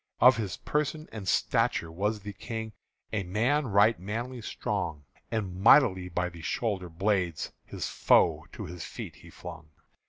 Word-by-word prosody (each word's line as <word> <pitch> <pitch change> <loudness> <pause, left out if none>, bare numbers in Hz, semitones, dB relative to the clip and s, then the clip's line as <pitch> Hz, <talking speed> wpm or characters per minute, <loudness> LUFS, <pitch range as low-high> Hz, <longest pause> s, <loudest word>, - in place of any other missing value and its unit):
Of 125 0 +7
his 105 -5 -3
person 150 +1 -1
and 105 -4 -7
stature 85 -2 +1
was 105 +5 -1
the 105 +1 -6
King 110 +1 -5 0.4
A 105 - +1
man 120 +10 +1
right 105 -1 +4
manly 120 +6 -4
strong, 75 -7 -3 0.2
And 95 -5 -3
mightily 95 -6 +6
by 90 +1 0
the 85 -1 -11
shoulderblades 95 -3 -1
His - - -4
foe - - +3
to - - -6
his 90 -1 -7
feet - - -7
he - - -14
flung. 80 -1 -10
100 Hz, 150 wpm, -29 LUFS, 90-115 Hz, 0.4 s, Of